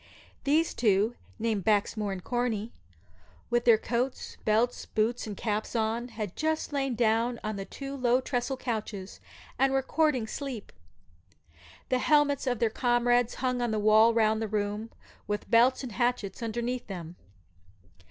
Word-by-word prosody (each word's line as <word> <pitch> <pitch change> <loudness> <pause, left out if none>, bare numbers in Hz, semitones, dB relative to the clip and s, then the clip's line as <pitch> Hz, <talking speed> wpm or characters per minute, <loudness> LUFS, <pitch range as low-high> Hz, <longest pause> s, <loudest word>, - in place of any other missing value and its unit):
These 310 +4 +2
two 215 0 +2 0.2
(named 220 -3 -1
Baxmore 210 0 +1
and 185 -2 -5
Corney), 240 -3 -1 0.8
with 240 0 +2
their 230 -2 +7
coats, 245 +4 -2
belts, 225 +3 +1
boots, 225 +2 0
and 205 -2 -6
caps 215 +1 -2
on, 225 +2 0
had 215 -5 -6
just 315 -1 -1
lain 270 -3 0
down 230 +1 +1
on 215 -2 -3
two 275 0 -6
low 250 -1 +3
tressel 260 0 -2
couches, 215 -6 -4 0.4
and 270 0 +4
were 270 0 +1
courting 295 -5 +1
sleep. 255 -2 -6 1.2
The 255 - +2
helmets 290 -1 +3
of 245 -1 +1
their 225 0 +1
comrades 240 0 +2
hung 250 -1 0
on 240 - 0
the 220 - 0
walls 215 +2 +5
round 220 -1 +3
the 220 - -1
room, 210 +1 -2 0.4
with 210 +3 -3
belts 245 +4 +5
and 250 - -5
hatchets 240 -3 -1
underneath 240 +2 -3
them. 175 -4 -7
235 Hz, 150 wpm, -29 LUFS, 215-250 Hz, 1.2 s, their